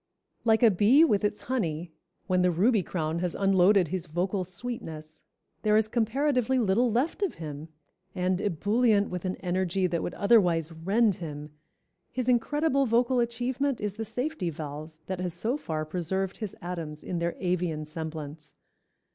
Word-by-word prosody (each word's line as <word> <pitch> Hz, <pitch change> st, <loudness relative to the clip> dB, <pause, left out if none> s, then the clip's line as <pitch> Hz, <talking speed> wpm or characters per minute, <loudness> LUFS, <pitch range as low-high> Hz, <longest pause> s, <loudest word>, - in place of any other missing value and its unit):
_ -, -, -36 dB
Like 220 Hz, +1 st, +4 dB
a 230 Hz, -, +7 dB
bee 215 Hz, -, +5 dB
with 210 Hz, -10 st, +1 dB
its 210 Hz, 0 st, -1 dB
honey, 175 Hz, -10 st, -2 dB, 0.3 s
when 185 Hz, -2 st, +2 dB
the 180 Hz, -, +4 dB
Ruby 200 Hz, +6 st, +3 dB
crown 165 Hz, -2 st, -2 dB
has 180 Hz, -1 st, -2 dB
unloaded 195 Hz, -2 st, +4 dB
his 180 Hz, 0 st, -3 dB
vocal 185 Hz, +4 st, -1 dB
sweetness, 165 Hz, -6 st, -7 dB, 0.4 s
there 210 Hz, +1 st, +3 dB
is 215 Hz, 0 st, +2 dB
comparatively 255 Hz, +3 st, +1 dB
little 230 Hz, +1 st, +2 dB
left 260 Hz, -, 0 dB
of 395 Hz, -, 0 dB
him, 155 Hz, -1 st, -7 dB, 0.5 s
and, 185 Hz, 0 st, 0 dB
ebullient 205 Hz, +3 st, +2 dB
with 180 Hz, 0 st, -4 dB
an 185 Hz, -, -1 dB
energy 185 Hz, 0 st, 0 dB
that 170 Hz, -2 st, 0 dB
would -, -, -4 dB
otherwise 180 Hz, -7 st, +3 dB
rend 195 Hz, +5 st, +1 dB
him, 150 Hz, -3 st, -7 dB, 0.6 s
his 250 Hz, 0 st, -3 dB
incredible 275 Hz, +3 st, +2 dB
vocal 240 Hz, +2 st, +2 dB
achievement 245 Hz, +3 st, -1 dB
is 205 Hz, -2 st, -2 dB
the 225 Hz, +2 st, -5 dB
safety 245 Hz, -, -3 dB
valve 150 Hz, 0 st, -6 dB, 0.2 s
that 185 Hz, -1 st, -4 dB
has 180 Hz, -2 st, -3 dB
so 225 Hz, +9 st, -1 dB
far 155 Hz, -, -3 dB
preserved 185 Hz, +4 st, -2 dB
his 215 Hz, -4 st, -5 dB
atoms 165 Hz, -4 st, -5 dB
in 175 Hz, -, -3 dB
their 170 Hz, 0 st, -1 dB
Avian 175 Hz, -4 st, -1 dB
semblance. 155 Hz, -1 st, -7 dB
190 Hz, 165 wpm, -28 LUFS, 170-230 Hz, 0.6 s, a